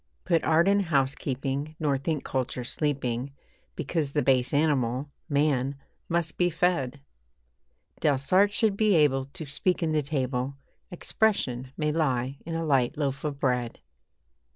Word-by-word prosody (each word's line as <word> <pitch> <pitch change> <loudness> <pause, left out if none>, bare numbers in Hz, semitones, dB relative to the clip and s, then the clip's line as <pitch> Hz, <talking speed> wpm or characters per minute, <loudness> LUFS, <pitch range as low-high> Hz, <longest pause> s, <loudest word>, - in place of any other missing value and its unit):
Put 170 -3 +2
art 160 +3 +4
in 200 +1 +4
housekeeping, 140 -2 -1
nor 145 -3 +1
think 145 +2 -2
culture 130 -1 -2
sleeping 135 -1 -2 0.4
Because 150 -5 -1
the 150 - +1
base 130 -1 +2
animal, 140 -2 +1 0.2
man, 140 -2 +1 0.3
must 170 -1 -1
be 175 0 +3
fed. 155 -6 0 1.0
Delsarte 150 +8 +3
should 210 -1 +2
be 210 -2 +3
able 135 -4 +3
to 155 +4 -8
speak 170 +6 0
in 160 - +1
the 155 -1 +2
table 135 -2 -2 0.3
'Expression' 155 - 0
may 150 -1 0
lie 135 -4 0
in 165 - -3
a 165 0 -1
light 135 0 +2
loaf 140 -2 -2
of 145 -2 -3
bread. 125 -3 0
145 Hz, 140 wpm, -27 LUFS, 130-160 Hz, 1.0 s, art